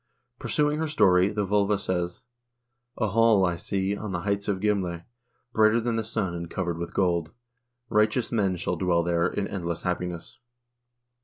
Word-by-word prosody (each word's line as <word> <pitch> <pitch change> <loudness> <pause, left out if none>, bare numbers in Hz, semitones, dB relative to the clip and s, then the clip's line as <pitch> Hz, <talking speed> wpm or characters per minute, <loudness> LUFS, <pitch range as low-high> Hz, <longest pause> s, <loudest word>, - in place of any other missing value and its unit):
Pursuing 150 0 0
her 160 - 0
story, 95 -9 +4
the 105 -1 -1
vglva 100 +1 +2
says: 90 -3 -3 0.7
A 110 -3 0
hall 110 -2 +4
I 90 -1 0
see 95 +3 -2
on 105 0 -5
the 90 - -2
heights 100 +1 -1
of 100 -2 0
Girale,1 95 -5 -1 0.5
brighter 110 +1 +4
than 115 0 -1
the 115 - -1
sun, 100 -4 -2
and 85 -1 -5
covered 85 -3 -3
with 85 - -6
gold; 85 -4 +1 0.6
righteous 110 +2 +1
men 100 -5 +1
shall 85 - -2
dwell 85 -2 +2
there 85 0 +1
in 100 -1 -2
endless 85 -4 -4
happiness. 90 -2 -4
95 Hz, 165 wpm, -26 LUFS, 90-105 Hz, 0.7 s, story